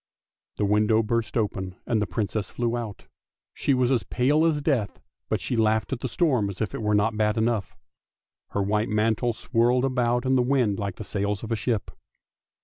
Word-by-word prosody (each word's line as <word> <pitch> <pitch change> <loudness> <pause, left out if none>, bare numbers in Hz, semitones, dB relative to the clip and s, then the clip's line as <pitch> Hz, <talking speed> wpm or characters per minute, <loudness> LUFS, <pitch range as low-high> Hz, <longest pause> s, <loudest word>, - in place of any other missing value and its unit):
The 105 - 0
window 105 +2 +3
burst 115 -1 -1
open 95 -4 -2
and 110 -2 +1
the 105 - 0
Princess 100 +2 -2
flew 120 -1 -1
out; 115 -4 -6 0.5
she 140 - +1
was 125 0 +2
as 125 -4 +3
pale 135 - +2
as 155 -3 +1
death, 135 - -1 0.3
but - - +1
she - - -2
laughed 110 +1 +1
at 125 - -3
the 130 - -3
storm 125 - +1
as 95 - -8
if 110 - -2
it - - -4
were 105 -1 +1
not 110 +2 +2
bad 105 0 +1
enough; 110 -3 0 0.7
her 100 - -1
white 105 +2 0
mantle 110 +2 +1
swirled 120 +3 +1
about 125 -1 +1
in 130 0 +3
the 125 - +4
wind 125 -6 +1
like 100 -3 -3
the - - -7
sails 100 0 -2
of 115 - -6
a - - +2
ship. 110 0 -2
110 Hz, 200 wpm, -25 LUFS, 105-125 Hz, 0.7 s, the